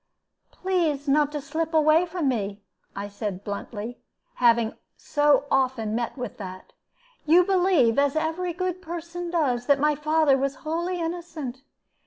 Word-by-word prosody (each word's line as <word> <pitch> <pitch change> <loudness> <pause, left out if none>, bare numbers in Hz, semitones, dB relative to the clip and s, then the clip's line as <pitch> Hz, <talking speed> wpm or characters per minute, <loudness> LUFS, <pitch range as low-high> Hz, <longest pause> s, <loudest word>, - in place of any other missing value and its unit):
"Please 330 -7 -1
not 295 +1 +3
to 295 - -3
slip 320 +3 -3
away 315 +3 +4
from 335 -3 -2
me," 205 -5 -2 0.3
I 200 +1 -4
said, 200 -1 -5
bluntly, 210 +3 -6 0.4
having 235 -2 +4 0.2
so 290 -2 +2
often 255 -5 +1
met 235 +4 -2
with 245 -4 -5
that. 185 -2 -9 0.5
"You 345 +4 +7
believe, 355 - +3
as 280 0 +2
every 325 +3 -1
good 365 +1 -3
person 345 0 -6
does, 265 -8 0
that 285 - +5
my 300 +1 +3
father 300 -1 +2
was 275 0 -1
wholly 345 +3 -1
innocent. 325 -6 -5
295 Hz, 145 wpm, -25 LUFS, 245-335 Hz, 0.5 s, You